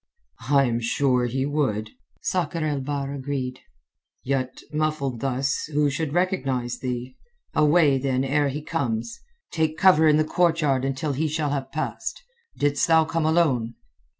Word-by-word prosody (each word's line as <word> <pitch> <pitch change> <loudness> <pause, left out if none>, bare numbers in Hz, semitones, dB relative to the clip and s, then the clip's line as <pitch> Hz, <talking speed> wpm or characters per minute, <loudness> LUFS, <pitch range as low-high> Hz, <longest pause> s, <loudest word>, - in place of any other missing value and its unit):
"I 140 -1 +5
am 120 -3 0
sure 125 +1 +1
he 130 +2 -1
would," 130 -8 -1 0.3
Sakr 170 -3 -1
el 145 -2 -1
Bahr 140 0 -3
agreed. 130 -2 -4 0.6
"Yet 130 -1 -2
muffled 150 -5 -1
thus, 135 +2 -1
who 145 -1 +2
should 145 +1 -2
recognize 135 -9 -1
thee? 125 0 -4 0.4
Away, 150 -2 +4
then, 130 -1 0
ere 145 +2 +1
he 145 +2 -5
comes. 120 -8 -2 0.3
Take 160 -1 0
cover 170 -4 +5
in 150 -1 +5
the 155 - +3
courtyard 155 -6 +1
until 135 +2 -2
he 155 +4 0
shall 150 -1 -1
have 135 -2 -3
passed. 155 - -4 0.3
Didst 145 0 +1
thou 160 -1 +5
come 160 0 -1
alone?" 135 -9 +2
140 Hz, 150 wpm, -24 LUFS, 130-155 Hz, 0.6 s, I